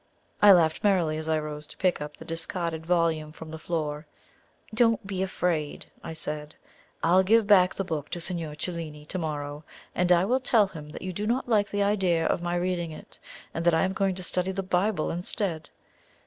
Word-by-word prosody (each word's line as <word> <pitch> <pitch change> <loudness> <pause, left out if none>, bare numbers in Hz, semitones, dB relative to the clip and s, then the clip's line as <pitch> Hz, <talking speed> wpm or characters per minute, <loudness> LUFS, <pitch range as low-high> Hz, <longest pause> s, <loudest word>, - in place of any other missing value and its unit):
I 205 - +9
laughed 165 -4 +4
merrily 175 -7 +2
as 160 0 -4
I 160 - +3
rose 150 -1 -5
to - - -11
pick 185 -4 +1
up 150 0 -6
the - - -11
discarded 165 -1 -2
volume 165 -3 +1
from 160 0 -10
the 160 - -7
floor. 155 -2 -3 0.7
"Don't 230 -2 +3
be 195 -2 -3
afraid," 175 -5 -1 0.2
I - - -6
said; 150 -1 -5 0.5
"I'll 180 +3 +5
give 220 +3 +4
back 185 -3 +5
the 195 - -1
book 155 -5 -4
to 175 - -4
Signor 165 -3 -2
Cellini 155 -2 -5
to 185 +4 -4
morrow, 150 -2 -4 0.3
and 180 0 +1
I 175 +1 +5
will 250 +5 +2
tell 230 -4 +4
him 160 -6 -9
that - - -8
you 185 0 -4
do 210 +4 -3
not 245 +3 0
like 210 -3 +2
the 205 0 0
idea 185 -5 +2
of - - +1
my 175 0 -1
reading 175 -1 -1
it, 155 - -10 0.3
and 165 - -3
that 170 -1 +4
I 160 - +3
am 190 0 0
going 195 -1 0
to 185 - -3
study 180 +1 +1
the 195 0 -3
Bible 185 -1 0
instead. 175 -1 -2
175 Hz, 205 wpm, -27 LUFS, 155-190 Hz, 0.7 s, I